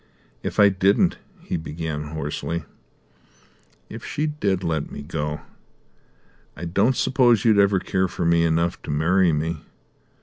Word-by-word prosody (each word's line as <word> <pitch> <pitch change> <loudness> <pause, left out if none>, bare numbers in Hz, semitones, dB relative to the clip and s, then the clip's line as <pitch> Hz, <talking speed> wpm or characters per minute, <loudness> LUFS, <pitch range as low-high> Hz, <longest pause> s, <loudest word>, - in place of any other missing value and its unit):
"If - - -4
I 100 -1 +8
didn't," 95 +1 +2 0.2
he - - -2
began 80 -1 -5
hoarsely 80 +2 -4 1.2
"if - - -9
she 150 - -2
did 100 -12 -1
let 80 -4 -2
me 70 - -7
go, 75 -1 -4 1.2
I 90 - -5
don't 100 +9 +2
suppose 120 -5 +3
you'd 110 -3 +5
ever 100 -1 +4
care 95 0 0
for 85 - -4
me 85 0 +3
enough 85 +1 0
to - - -10
marry 85 +5 +3
me? 80 +1 -2
85 Hz, 140 wpm, -23 LUFS, 80-100 Hz, 1.2 s, I